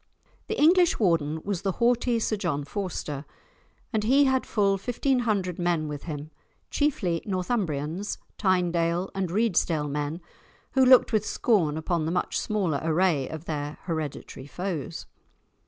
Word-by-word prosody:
The - - -3
English 345 +3 +5
Warden 160 -6 +1
was 200 -3 -2
the 195 -1 -1
haughty 240 +1 +2
Sir 220 -1 0
John 170 -8 -2
Forster, 150 -5 -4 0.7
and 215 -1 +1
he 270 +6 +5
had 265 -1 +1
full 200 -3 +2
fifteen 250 +4 0
hundred 200 -7 -1
men 175 -3 0
with 145 -1 -6
him, 155 -1 -6 0.4
chiefly 195 - 0
Northumbrians, 185 - -2 0.2
Tynedale, 175 -2 +1
and 190 -2 -2
Reedsdale 170 -7 +1
men, 150 +3 -2 0.5
who 265 - +4
looked 255 -2 +6
with 215 -2 +3
scorn 175 -11 +1
upon 160 0 -1
the 160 - -1
much 180 - -1
smaller 185 -10 -1
array 160 -4 +2
of 160 0 -7
their 150 -2 -4
hereditary 155 -4 -5
foes. 180 -2 -4
180 Hz, 140 wpm, -26 LUFS, 155-215 Hz, 0.7 s, looked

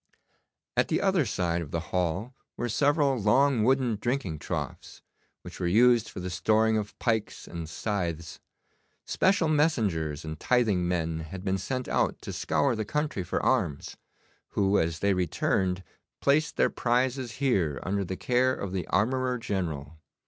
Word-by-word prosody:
At - - +3
the - - +1
other 190 -8 +2
side 85 -2 -1
of 80 - -6
the 85 - -2
hall 90 +7 -1 0.2
were 120 - -2
several 145 +2 +2
long 125 +3 +3
wooden 125 -2 +2
drinking 120 - -2
troughs, - - -5 0.4
which - - -10
were 90 - 0
used 115 +4 +4
for - - -8
the 90 0 -4
storing 110 +4 +2
of 105 -1 -3
pikes 110 -3 -1
and 85 -2 -6
scythes. 85 -4 -3 0.7
Special 190 -3 +2
messengers 100 - +1
and 80 0 -6
tithing 110 -8 +2
men 80 -2 -1
had 90 +4 -7
been 95 0 0
sent 130 +7 -3
out - - 0
to - - -5
scour 140 -4 +1
the 110 - -2
country 150 -1 -2
for 90 - -2
arms, 70 -1 0 0.6
who, 100 0 +3
as 80 0 -1
they 100 0 +3
returned, 90 +1 0 0.4
placed 150 +2 +2
their - - +3
prizes 125 0 0
here 95 - +1
under 100 +2 -1
the 95 0 -5
care 130 +1 +2
of 100 - -5
the 90 -3 -3
armourer 125 +4 +1
general. 80 - -4
105 Hz, 155 wpm, -28 LUFS, 90-125 Hz, 0.7 s, used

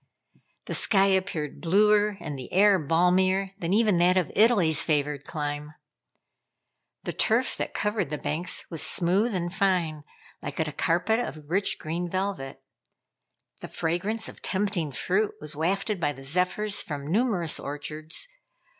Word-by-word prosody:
The - - -5
sky 195 -2 +4
appeared 185 -6 -1
bluer, 210 +3 +3
and 150 -4 -5
the 130 -2 -8
air 200 +1 +5
balmier 185 +5 +2
than 170 -2 -2
even 210 -3 +3
that 180 +2 +4
of 180 -4 0
Italy's 200 - +4
favored 145 -2 -1
clime. 150 -1 -4 1.3
The - - -4
turf 235 +3 +1
that - - -4
covered 210 -7 -1
the 150 - -3
banks 155 +5 -4
was 165 - +1
smooth 195 +6 +2
and 175 -1 -2
fine, 175 -6 0 0.4
like - - -6
a 155 -1 0
carpet 175 +9 +1
of 155 -11 -5
rich 195 +2 +1
green 170 +3 -4
velvet. 185 -7 -3 1.0
The - - -7
fragrance 195 +7 -2
of - - -11
tempting 190 -6 -1
fruit 195 +10 0
was 150 0 -7
wafted 195 +6 -1
by 145 -3 0
the 135 0 -12
zephyrs 180 +7 +2
from 145 -3 -6
numerous 200 -7 0
orchards. 150 - -4
180 Hz, 145 wpm, -26 LUFS, 155-200 Hz, 1.3 s, air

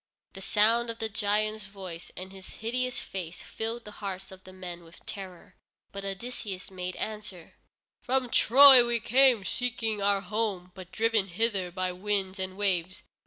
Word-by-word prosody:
The 195 - -8
sound 230 +4 +3
of 230 - -4
the 220 -1 -2
giant's 215 0 0
voice, 185 -4 -9
and 185 +1 -7
his 190 -1 -11
hideous 250 +3 -2
face 180 -3 -6
filled 225 +1 -4
the 210 - -9
hearts 195 -1 -5
of 190 0 -13
the 185 - -11
men 180 -2 -8
with 165 +1 -17
terror, 190 -3 -8 0.4
but 200 0 -6
Odysseus 195 -1 -5
made 180 -1 -5
answer: 210 -6 -6 0.5
"From 255 -1 0
Troy 265 +1 +9
we 240 0 0
come, 250 -1 +4
seeking 225 -2 -2
our 200 0 +2
home, 200 -2 -2
but 185 -2 -11
driven 225 -3 +1
hither 195 -1 0
by 185 0 -2
winds 195 0 -2
and 185 0 -3
waves. 185 -3 0
200 Hz, 165 wpm, -28 LUFS, 185-225 Hz, 0.5 s, Troy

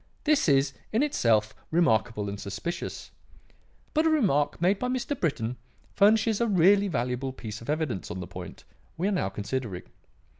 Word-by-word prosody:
This 300 - +3
is, 135 0 +3 0.2
in 225 +6 +2
itself, 110 - +2 0.2
remarkable 110 -10 +2
and 100 0 -5
suspicious. 100 - -5 0.8
But 315 +1 +3
a - - +5
remark 195 - +2
made 190 +4 +2
by 250 - -1
Mr. 255 +3 -1
Britton 125 -7 -1 0.4
furnishes 215 +2 +4
a 235 - +2
really 200 +1 +4
valuable 125 -3 -2
piece 110 -4 -7
of 115 - -10
evidence 150 - -2
on 95 - -5
the 90 - -5
point 90 0 -9 0.3
we 180 +4 0
are - - +1
now 180 - 0
considering. 100 -1 -4
145 Hz, 160 wpm, -27 LUFS, -, 0.8 s, a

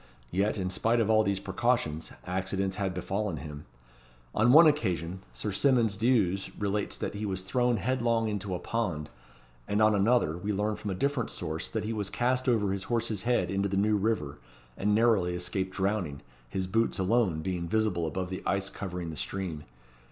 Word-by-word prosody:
Yet, 100 +4 +1
in 95 -2 -2
spite 115 +5 +2
of 110 -1 +2
all 110 0 +5
these 100 -2 0
precautions, 95 -6 -1
accidents 95 +1 -1
had 100 -2 0
befallen 95 0 -2
him. 75 -1 -8 0.7
On 110 +3 +4
one 160 +5 +9
occasion, 95 - +1
Sir 60 +12 -4
Symonds 115 -1 +3
D'Ewes 105 -5 +2
relates 105 0 -1
that - - -3
he 105 +1 -5
was 95 -3 -2
thrown 120 +4 +1
headlong 115 0 +1
into 105 -3 -2
a - - -4
pond; 90 -10 -2 0.6
and 105 - 0
on 110 0 +5
another, 105 -4 +3
we 100 +5 -3
learn 105 +2 0
from 105 0 -5
a 95 - -2
different 140 +3 0
source 80 -2 -4
that 110 - -2
he 110 +2 -2
was 105 -3 -2
cast 125 +1 +1
over 105 -5 +2
his 95 -1 -3
horse's 115 -4 0
head 120 -6 +2
into 100 +1 0
the 95 - -1
New 105 +2 +3
River, 100 -9 -1 0.4
and 105 +1 +1
narrowly 105 -6 +3
escaped 95 +2 -3
drowning, 95 -7 -1 0.3
his 95 +8 -2
boots 115 +5 +1
alone 95 -5 +1
being 90 -2 -2
visible 95 -4 +1
above 90 +3 -3
the 95 - -4
ice 95 0 0
covering 90 -4 -5
the - - -7
stream. 85 -4 -4
100 Hz, 185 wpm, -29 LUFS, 90-110 Hz, 0.7 s, one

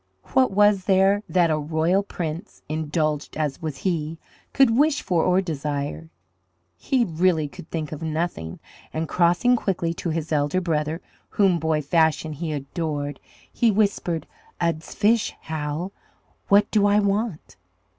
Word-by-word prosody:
What 260 -1 +4
was 205 -1 +3
there 195 +1 +4
that 175 -3 +3
a 155 - +1
royal 160 +5 +1
prince, 170 -4 -6
indulged 155 -1 -2
as 150 -3 -2
was 155 -4 -4
he, 165 -3 -2 0.3
could 265 -5 +4
wish 295 +2 +3
for 175 -4 +1
or 180 +1 +3
desire? 140 - -4 0.7
He 250 - +1
really 165 -3 +1
could 155 - -12
think 155 -3 -4
of 155 - -6
nothing, 160 - -3 0.3
and 160 +1 -2
crossing 175 +10 +3
quickly 175 -7 -1
to 170 - -4
his 160 0 -3
elder 145 +3 +1
brother, 160 -1 -1 0.3
whom, 190 -4 +2
boy 160 -1 0
fashion, 160 0 +2
he 160 +2 -4
adored, 145 0 -3 0.3
he 235 - +3
whispered, 195 -6 0 0.3
"Ud's 165 -2 -2
fish, 220 +2 +2
Hal, 160 +3 -4 0.6
what 205 0 +4
DO 205 -2 +4
I 205 0 +4
want?" 205 -3 -1
165 Hz, 145 wpm, -24 LUFS, 155-195 Hz, 0.7 s, What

